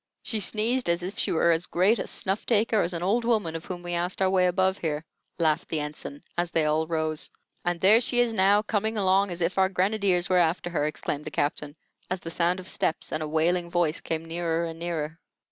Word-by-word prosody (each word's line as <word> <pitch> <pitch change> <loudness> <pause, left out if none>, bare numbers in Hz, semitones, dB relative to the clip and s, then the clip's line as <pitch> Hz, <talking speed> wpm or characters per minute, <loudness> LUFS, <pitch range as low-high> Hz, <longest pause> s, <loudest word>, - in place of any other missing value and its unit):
"She 220 - 0
sneezed 220 +4 0
as 170 +1 +1
if 185 +2 -5
she - - 0
were 170 +1 +3
as 165 +1 0
great 195 +6 +2
a - - -3
snuff 195 +2 -1
taker 220 -1 +3
as 175 +1 -1
an 170 - -3
old 220 +6 +1
woman 215 -9 0
of 165 - -6
whom 175 -1 -6
we 175 0 -4
asked 175 +1 -1
our 190 -1 +2
way 185 -1 +3
above 190 +2 +1
here," 155 -1 -2 0.3
laughed 160 -2 +1
the 160 - -1
Ensign, 150 -1 -6
as 175 0 0
they 165 -2 +1
all 155 +1 +1
rose. 155 -2 -2 0.3
"And 175 -1 -1
there 210 +6 +6
she 245 0 +2
is 240 -2 +2
now, 200 +1 +4
coming 220 +1 -1
along 195 0 +3
as 175 -1 -3
if 180 +3 0
our 190 0 +4
grenadiers 190 -1 +1
were 185 -1 +3
after 175 +1 +1
her!" 150 -3 0
exclaimed 150 -1 -3
the - - -4
Captain, 145 0 -2 0.3
as 185 - -2
the 165 - -7
sound 175 +2 +1
of 185 - -10
steps 160 - -1
and 155 - -2
a 155 - -2
wailing 170 +3 +1
voice 170 -3 0
came 165 0 -3
nearer 165 0 -1
and 165 0 -7
nearer. 165 -2 -4
175 Hz, 230 wpm, -26 LUFS, 165-195 Hz, 0.3 s, there